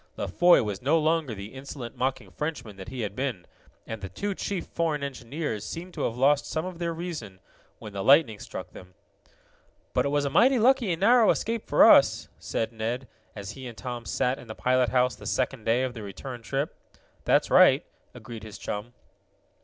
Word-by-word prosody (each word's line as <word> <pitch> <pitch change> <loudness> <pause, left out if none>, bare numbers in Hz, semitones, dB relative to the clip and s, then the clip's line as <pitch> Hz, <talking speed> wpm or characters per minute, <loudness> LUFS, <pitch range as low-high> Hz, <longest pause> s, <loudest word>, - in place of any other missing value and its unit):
La - - -2
Foy 175 -5 +5
was 105 -3 -4
no 145 +6 +3
longer 155 -6 +1
the 100 +3 -8
insolent, 130 -2 -8
mocking 130 +1 -2
Frenchman 135 -9 -5
that 95 +1 -10
he 125 +1 -5
had 105 -2 -4
been, 125 -9 -3 0.4
and 110 -2 -6
the 95 - -6
two 200 - -3
chief 195 -1 -3
foreign 160 -4 -1
engineers 135 -3 -4
seemed 175 +10 -7
to - - -5
have 115 - -3
lost 140 +3 +3
some 160 +2 -2
of 180 -2 -7
their 170 -1 -1
reason 160 - -6 0.4
when 105 -2 -10
the 100 -1 -3
lightning 135 -5 +5
struck - - -8
them. 90 0 -13 1.0
"But - - +2
it - - 0
was 145 0 +1
a 140 - -1
mighty 260 - +5
lucky 245 -3 +3
and 165 - -2
narrow 235 +2 +6
escape 230 0 0
for - - +6
us," - - +5
said 115 +1 -3
Ned, 115 +3 -3 0.3
as 100 -1 -6
he 130 +4 -8
and 115 -2 -10
Tom 120 -1 -6
sat 125 +2 0
in 125 - -12
the 110 - -7
pilot 125 -1 +2
house 125 0 +2
the - - -10
second 130 -3 -1
day 120 +3 +2
of 130 -1 -2
the 115 - -8
return 120 +5 -7
trip. 135 +5 -2 0.5
"That's - - +2
right," - - +6 0.3
agreed 115 -1 -9
his 110 -1 -9
chum. 105 +4 -5
130 Hz, 200 wpm, -27 LUFS, 110-160 Hz, 1.0 s, narrow